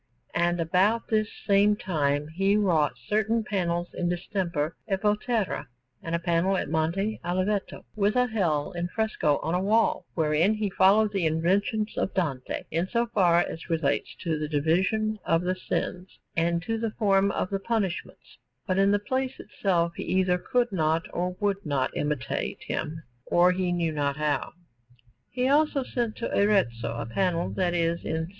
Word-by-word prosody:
And 175 +1 +1
about 190 +7 +2
this 215 -1 +1 0.2
same 205 +1 +4
time 150 -7 -1
he 195 +5 +2
wrought 165 -9 +2
certain 220 +2 +1
panels 175 -4 -1
in 175 - -1
distemper 175 -3 -2
at 195 -1 -1
Volterra, 210 - 0 0.3
and 165 0 -2
a - - 0
panel 170 +3 +1
at 155 - -3
Monte 175 +7 0
Oliveto, 185 +3 -2
with 210 +1 +1
a 250 0 +4
Hell 175 -11 0
in 175 -1 -3
fresco 180 -8 0
on 165 - -1
a 180 - +2
wall, 225 +10 +2
wherein 160 +5 +2
he 210 -2 -2
followed 205 +3 +4
the 190 -5 +1
invention 195 +7 +1
of - - -1
Dante 140 -9 -2
in 165 +3 0
so 235 +3 +1
far 175 -5 +4
as 165 +1 -6
relates 155 -4 0
to 160 -3 -1
the 150 - -2
division 190 +9 +1
of 165 +1 +1
the 180 +1 +1
sins 185 0 -4 0.2
and 170 0 +1
to 225 +2 -2
the 225 0 -1
form 200 -3 +3
of 185 - -2
the 195 - 0
punishments, 195 -3 -3 0.3
but 185 -2 0
in 195 0 +4
the 205 - +4
place 260 +5 -2
itself 175 -4 0
he - - -4
either 185 0 +1
could 245 +2 0
not 160 -2 +1
or 180 +1 -2
would 200 -1 0
not 140 -4 -1
imitate 145 -6 -2
him, 160 +1 -4 0.2
or 175 +1 +4
knew 175 -3 0
not 145 -2 -1
how. 150 -2 -1 0.8
He 250 0 0
also 290 0 +3
sent 240 -3 -2
to 235 - -3
Arezzo 120 - +2
a 115 - -4
panel 175 +8 0
that 180 -2 0
is 170 0 0
in - - -2
S. - - -5
185 Hz, 170 wpm, -27 LUFS, 165-210 Hz, 0.8 s, same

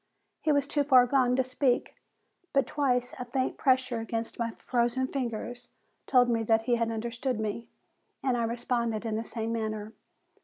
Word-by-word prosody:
He 310 - +2
was 285 -1 +3
too 290 0 +1
far 260 -3 +6
gone 250 -1 +3
to 260 - +3
speak, 255 0 0 0.6
but 275 -2 +3
twice 250 -3 0
a 250 - -4
faint 255 +1 -1
pressure 255 -3 +2
against 225 +1 -4
my 230 -1 0
frozen 240 +2 0
fingers 245 -2 -4 0.4
told 250 -2 +5
me 230 -1 +1
that 225 0 +2
he 240 - +1
had 230 -1 0
understood 235 +2 -2
me, 220 +2 -3 0.6
and 260 -2 +2
I 235 - 0
responded 235 -1 -1
in 220 -1 -1
the 225 - -2
same 225 0 -4
manner. 215 -1 -3
240 Hz, 175 wpm, -29 LUFS, 230-260 Hz, 0.6 s, far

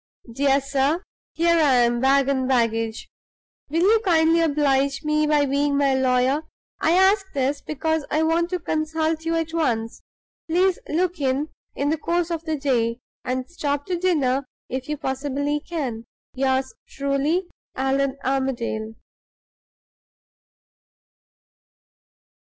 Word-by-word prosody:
"Dear 275 +2 +3
Sir 275 +5 0 0.3
Here 335 +1 +3
I 285 -5 +4
am, 240 -1 +3
bag 270 +1 +3
and 265 -2 0
baggage. 230 -3 0 0.6
Will 325 +3 0
you 440 +4 +5
kindly 330 -3 +4
oblige 280 -2 +1
me 305 0 +1
by 295 -1 +3
being 280 +1 +1
my 280 -1 +3
lawyer? 260 +2 +2 0.4
I 320 - +2
ask 385 +1 +3
this, 275 +1 -1
because 315 +1 -1
I 310 +1 +1
want 335 +2 +1
to 365 - -1
consult 315 0 -1
you 330 0 0
at 325 0 -2
once. 230 -9 -1 0.5
Please 365 +2 +2
look 355 +2 0
in 275 +2 0 0.3
in 280 +1 0
the 315 0 0
course 345 +2 -1
of 330 -1 -3
the 315 -1 -1
day, 240 -5 0 0.3
and 255 0 -2
stop 290 -4 -2
to 365 - -2
dinner 280 -7 +1 0.2
if 260 +2 -4
you 300 - -2
possibly 285 +2 -2
can. 270 -9 -4 0.3
Yours 265 0 0
truly. 280 +6 0 0.3
ALLAN 270 +1 0
ARMADALE." 240 -5 -2
285 Hz, 130 wpm, -23 LUFS, 265-320 Hz, 0.6 s, you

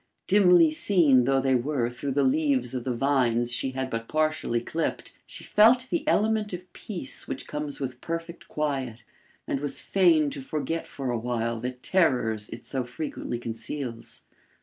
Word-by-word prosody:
Dimly 180 -5 +6
seen 155 -7 +4
though 135 +1 +3
they 135 0 +2
were 125 0 +1
through 125 +3 -4
the 140 +1 +2
leaves 130 -3 +1
of 125 -2 -4
the 130 - 0
vines 120 -2 +1
she 130 +2 -2
had 130 0 -2
but 115 0 -3
partially 155 -6 0
clipped, 160 +7 -3
she - - -10
felt 240 +4 +4
the 340 - -1
element 215 -1 +2
of 180 +1 -8
peace 175 -11 -5
which 130 - -5
comes 150 -1 -5
with 130 -2 -5
perfect 165 +1 -5
quiet, 135 -6 -3 0.4
and 135 - -1
was 145 0 -3
fain 165 -6 +3
to 140 - -6
forget 155 +4 -3
for 135 -3 -4
awhile 115 -1 -2
the 125 +2 -3
terrors 125 - +1
it 115 - -9
so 130 -2 -2
frequently 125 -1 -5
conceals. 115 +1 -6
135 Hz, 165 wpm, -26 LUFS, 125-160 Hz, 0.4 s, Dimly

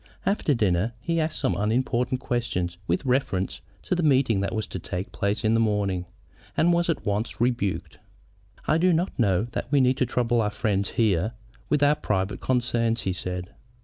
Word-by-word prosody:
After 190 -7 +2
dinner 105 0 +1
he 165 +7 -1
asked 155 0 -1
some 130 - 0
unimportant 125 +4 0
question 115 -9 -1 0.2
with 85 +9 0
reference 125 -8 0 0.2
to - - -1
the 175 - +1
meeting 130 - +3
that 100 - -1
was 110 - -1
to 95 - -6
take 90 +3 -5
place 100 +1 -1
in 110 0 +3
the 115 - +3
morning, 100 -5 0 0.5
and 175 +1 +4
was 170 0 +1
at 165 - -1
once 105 +3 -2
rebuked. 115 -8 -1 0.7
"I 160 - +2
do 180 +1 +4
not 175 +4 +1
know 100 -4 +3
that 125 - -4
we 145 - +4
need 130 0 +3
trouble 120 -1 +1
our 105 - +1
friend 105 -2 0
here 105 -1 +1 0.4
with 150 -1 +2
our 145 +1 +6
private 105 -7 -1
concerns," 120 -2 +1
he 95 - -1
said. 90 +1 -5
115 Hz, 180 wpm, -25 LUFS, 100-130 Hz, 0.7 s, our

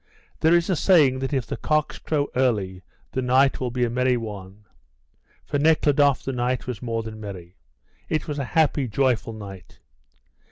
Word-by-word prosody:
There 160 +2 +4
is 170 0 +2
a 185 - +1
saying 150 -7 +4
that 135 +1 -3
if 135 -5 -1
the - - -5
cocks 155 -1 0
crow 145 -2 -1
early 105 -8 0 0.3
the 130 - -2
night 130 +2 +3
will 125 - -2
be 125 +1 -1
a - - -2
merry 125 +1 +2
one. 105 -2 -8 0.8
For 145 - -1
Nekhludoff 145 -2 +3
the 135 - -3
night 125 0 -1
was 125 -5 -5
more 115 -2 -2
than 110 -1 -8
merry; 95 -4 -9 0.5
it 155 - -1
was 145 -1 -3
a 140 - -2
happy, 145 -4 +3
joyful 120 -1 0
night. 100 -4 -10
125 Hz, 175 wpm, -24 LUFS, 110-145 Hz, 0.8 s, There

